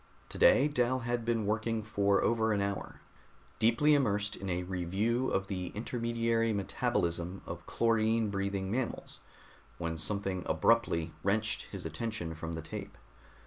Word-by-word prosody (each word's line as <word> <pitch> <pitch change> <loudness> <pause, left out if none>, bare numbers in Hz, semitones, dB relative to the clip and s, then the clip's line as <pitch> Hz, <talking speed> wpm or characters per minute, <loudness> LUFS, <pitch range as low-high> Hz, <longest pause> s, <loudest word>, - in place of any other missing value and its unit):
Today 140 - +5
Dal 130 -2 +1
had 120 0 -1
been 115 -2 0
working 110 +1 0
for 100 -2 +2
over 110 -1 +2
an 100 - +1
hour, 100 0 -3 0.6
deeply 120 +7 +4
immersed 105 -7 +1
in 95 - -6
a 90 0 -1
review 95 +8 0
of 95 - 0
the 90 -2 -4
intermediary 115 0 0
metabolism 90 -2 -1
of - - -7
chlorine 115 -1 +2
breathing 100 -1 -2
mammals, 120 +1 -3 0.6
when 85 -1 -3
something 95 +2 -2
abruptly 85 -2 +2
wrenched 110 +3 0
his - - -6
attention 85 0 -3
from 80 +1 -5
the 80 0 -5
tape. - - -7
105 Hz, 140 wpm, -32 LUFS, 95-115 Hz, 0.6 s, Today